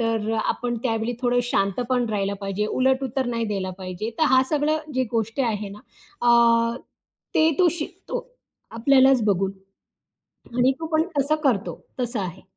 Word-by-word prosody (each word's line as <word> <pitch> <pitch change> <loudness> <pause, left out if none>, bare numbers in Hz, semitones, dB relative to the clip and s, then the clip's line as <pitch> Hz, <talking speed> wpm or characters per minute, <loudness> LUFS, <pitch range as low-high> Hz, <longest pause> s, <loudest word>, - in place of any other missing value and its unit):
तर 225 -1 0
आपण 240 0 -1
त्यावेळी 225 -1 -1
थोडं 245 0 +2
शांतपण 240 +2 0
राहिला 200 -1 -1
पाहिजे. 195 +1 -2
उलट 260 +3 +1
उत्तर 260 +1 -2
नाही 230 -1 -1
द्यायला 195 -3 -2
पाहिजे. 185 +4 -5
तर 315 - +4
हा 260 - +6
सगळं 305 +1 +1
जी 260 0 +2
गोष्ट 225 +3 -1
आहे 210 -3 -2
ना, 200 +1 -10 0.4
अ, 235 -1 +4 0.6
ते 315 +1 +5
तो 360 - +5
शिकतो. 390 +9 -5 0.5
आपल्यालाच 260 +1 +4
बघून. 195 -2 +1 1.1
आणि 255 +2 +4
तो 325 - -4
पण 315 0 +3
तसं 285 +3 +2
करतो 235 -8 0 0.2
तसं 240 -2 -2
आहे. 180 -4 -5
235 Hz, 155 wpm, -24 LUFS, 210-260 Hz, 1.1 s, हा